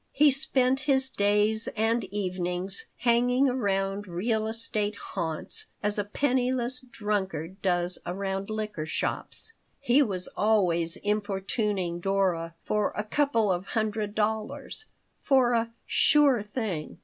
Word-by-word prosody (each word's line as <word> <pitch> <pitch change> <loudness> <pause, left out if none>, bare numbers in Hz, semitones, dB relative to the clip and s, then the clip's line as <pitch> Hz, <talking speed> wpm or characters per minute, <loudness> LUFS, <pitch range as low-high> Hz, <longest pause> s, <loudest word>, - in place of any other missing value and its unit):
He 295 +1 +5
spent 265 -2 +2
his 265 -1 +4
days 210 +2 +1
and 225 +2 +1
evenings 185 -1 -2
hanging 245 +2 +3
around 200 -5 -1
real 215 +5 -1
estate 215 -2 +2
haunts 160 -5 -5 0.2
as 210 0 +1
a - - +1
penniless 255 +2 0
drunkard 200 -7 -3
does 175 -1 0
around 195 +2 -3
liquor 210 -7 -4
shops. 450 - -2 0.3
He 275 +1 +4
was 190 -8 +1
always 175 -6 +2
importuning 200 -3 -1
Dora 175 -3 0
for 210 -1 0
"a 210 - -1
couple 225 -3 +1
of 180 +1 -2
hundred 215 -1 -1
dollars" 220 - -2 0.3
for 260 -3 +3
a 230 0 +1 0.2
"sure 280 -6 +4
thing." 205 -7 -4
210 Hz, 120 wpm, -27 LUFS, 190-240 Hz, 0.3 s, He